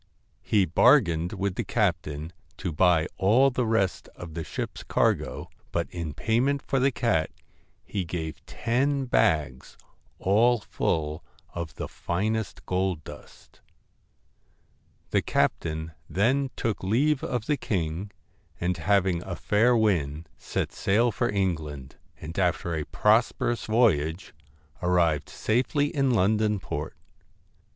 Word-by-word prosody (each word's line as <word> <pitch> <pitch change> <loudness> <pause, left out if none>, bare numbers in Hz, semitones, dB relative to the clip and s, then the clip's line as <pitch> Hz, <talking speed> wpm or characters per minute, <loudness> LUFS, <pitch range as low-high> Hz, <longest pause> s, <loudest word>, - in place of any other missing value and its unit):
He 100 -3 +2
bargained 90 - +4
with 100 -1 -1
the - - -2
captain 85 -7 -1 0.2
to 90 - -3
buy 80 0 +3
all 120 +8 +4
the 125 -2 -1
rest 100 -5 0
of 85 -2 -9
the 80 0 -4
ship's - - -5
cargo, - - 0 0.2
but 85 -1 -1
in 85 -4 -5
payment 130 +5 +1
for 135 - 0
the 135 +2 +3
cat 110 -11 +1 0.6
he 100 - -3
gave 80 -2 -5
ten 135 +4 0
bags 75 - 0 0.4
all 115 +5 +3
full 80 -4 -2 0.3
of 85 -5 -5
the - - -4
finest 110 +5 -3
gold 90 -3 -1
dust 75 0 -13 1.5
The - - +3
captain 80 0 -1 0.2
then 125 - +1
took 115 -3 -2
leave 130 +9 +1
of 120 -3 -2
the 150 - +1
king, 90 - -2 0.5
and 90 +1 -1
having 95 -3 +2
a 90 -1 -5
fair 115 +7 +3
wind 85 -8 0
set - - -3
sail 115 +5 +2
for 120 +3 -1
England, 80 -9 -2 0.2
and 80 +5 -6
after 90 -2 0
a 80 -2 -2
prosperous 115 +1 +1
voyage 95 -8 +1 0.5
arrived 85 -4 +2
safely 145 +6 0
in 135 -2 +2
London 105 -1 +2
port. - - -5
95 Hz, 125 wpm, -26 LUFS, 80-115 Hz, 1.5 s, bargained